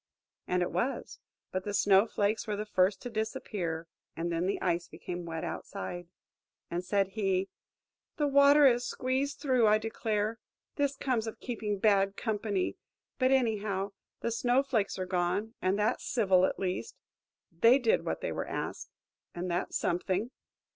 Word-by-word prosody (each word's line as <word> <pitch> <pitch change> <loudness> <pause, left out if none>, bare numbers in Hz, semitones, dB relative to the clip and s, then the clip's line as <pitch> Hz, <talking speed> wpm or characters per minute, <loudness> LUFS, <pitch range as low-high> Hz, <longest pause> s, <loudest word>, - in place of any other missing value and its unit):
And 180 0 +1
it - - -3
was; 270 +3 -2 0.3
but 185 0 -2
the 205 0 -3
Snow 200 +1 +5
flakes 210 +2 0
were 210 - -1
the 210 +1 -3
first 190 -1 +1
to 245 - -4
disappear, 185 -6 -3 0.3
and 170 +1 -2
then 170 +2 0
the 200 - 0
Ice 175 -1 0
became 175 -1 -7
wet 160 -1 -4
outside. 175 - -5 0.6
And 175 +1 -2
said 195 +1 +1
he: 195 -2 0 0.7
"The 300 - +2
water 280 +1 +6
has 245 -2 +5
squeezed 265 +3 -1
through, 255 -6 +3
I 210 0 +6
declare! 220 0 -2 0.4
This 285 -1 0
comes 250 -5 -1
of 220 - -6
keeping 215 -4 -3
bad 195 -1 +3
company; 210 -4 -1 0.4
but, 255 -1 +4
anyhow, 210 -6 +1 0.3
the 235 - -1
Snow 245 +3 +2
flakes 225 -7 0
are 185 - -2
gone, 185 +4 -1
and 185 +2 +1
that's 210 +1 +1
civil 190 -6 +4
at - - -4
least. 180 -11 -3 0.6
They 230 +10 +5
did 245 -5 +2
what - - -3
they - - -2
were - - -3
asked, - - -4 0.5
and 175 +1 -3
that's 175 +2 -1
something." 185 +6 -1
205 Hz, 160 wpm, -30 LUFS, 185-235 Hz, 0.7 s, water